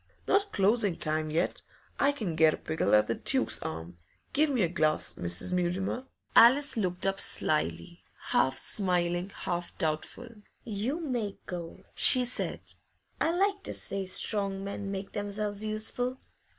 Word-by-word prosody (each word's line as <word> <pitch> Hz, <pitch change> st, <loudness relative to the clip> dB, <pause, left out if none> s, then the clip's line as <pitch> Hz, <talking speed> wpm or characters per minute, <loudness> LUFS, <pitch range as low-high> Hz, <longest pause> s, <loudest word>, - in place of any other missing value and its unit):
'Not 400 Hz, 0 st, +2 dB
closing 200 Hz, -2 st, +1 dB
time 155 Hz, 0 st, -1 dB
yet. 165 Hz, +4 st, -1 dB, 0.4 s
I 280 Hz, -, +4 dB
can 215 Hz, -, -4 dB
get 160 Hz, -1 st, +4 dB
a -, -, -13 dB
pickle 155 Hz, -10 st, +1 dB
at 105 Hz, 0 st, +4 dB
the -, -, -1 dB
"Duke's -, -, +1 dB
Arms." 80 Hz, +2 st, -6 dB, 0.4 s
Give 305 Hz, +2 st, +3 dB
me 250 Hz, -7 st, +1 dB
a -, -, +3 dB
glass, 155 Hz, -3 st, +1 dB
Mrs. 90 Hz, -, 0 dB
Mutimer.' 185 Hz, +8 st, -1 dB, 0.3 s
Alice 275 Hz, +5 st, +7 dB
looked 180 Hz, -5 st, -1 dB
up 195 Hz, 0 st, 0 dB
slily, 85 Hz, +2 st, 0 dB, 0.3 s
half 130 Hz, 0 st, +2 dB
smiling, 175 Hz, +1 st, -1 dB
half 175 Hz, -1 st, -4 dB
doubtful. 195 Hz, +8 st, -3 dB, 0.3 s
'You 230 Hz, +8 st, -3 dB
may 240 Hz, -9 st, -3 dB
go,' 170 Hz, -2 st, -7 dB
she 255 Hz, -1 st, +6 dB
said. 245 Hz, -, -2 dB, 0.6 s
'I 325 Hz, -, +2 dB
like 400 Hz, +1 st, +1 dB
to -, -, -4 dB
see 195 Hz, -1 st, 0 dB
strong 195 Hz, 0 st, 0 dB
men 200 Hz, 0 st, -5 dB
make 195 Hz, 0 st, -5 dB
themselves 205 Hz, 0 st, -3 dB
useful. 220 Hz, +4 st, -2 dB
195 Hz, 150 wpm, -29 LUFS, 165-235 Hz, 0.6 s, Alice